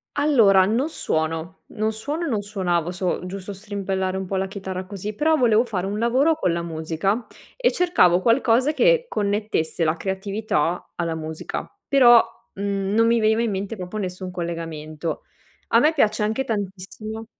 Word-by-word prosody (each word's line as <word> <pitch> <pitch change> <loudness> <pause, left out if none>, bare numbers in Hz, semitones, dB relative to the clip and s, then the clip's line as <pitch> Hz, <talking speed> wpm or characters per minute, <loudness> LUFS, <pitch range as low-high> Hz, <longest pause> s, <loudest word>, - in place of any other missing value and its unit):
Allora, 225 -11 +5
non 245 +9 0
suono, 160 - -3
non 215 +1 -2
suono 295 +10 -3
e - - -2
non 220 -7 0
suonavo. 180 -5 -1
So 180 0 -2
giusto 195 +2 -6
strimpellare 195 -2 -3
un 190 - -3
po' 190 +1 -4
la 190 0 0
chitarra 190 -2 -5
così, 200 +2 -6
però 315 +3 +2
volevo 230 -2 +4
fare 195 -6 -3
un 205 +2 -3
lavoro 265 +7 +3
con 180 - 0
la 170 - -1
musica 170 +7 -2 0.3
e - - +2
cercavo 265 - +3
qualcosa 245 +4 +3
che - - +3
connettesse 205 - -1
la 155 +1 +2
creatività 190 -2 -2
alla 165 -2 -2
musica, 160 0 -5 0.2
però, 240 -4 +7 0.3
mhmm, 200 0 -2
non 230 +1 +4
mi 230 -1 +3
veniva 220 +1 +3
in 230 -3 0
mente 200 +3 -4
proprio 180 +2 -7
nessun 185 -2 -4
collegamento. 165 -2 -5 0.5
A - - +5
me 310 +2 +4
piace 215 -7 +2
anche 220 +5 0
tantissimo 215 0 -5
200 Hz, 165 wpm, -23 LUFS, 180-230 Hz, 0.5 s, però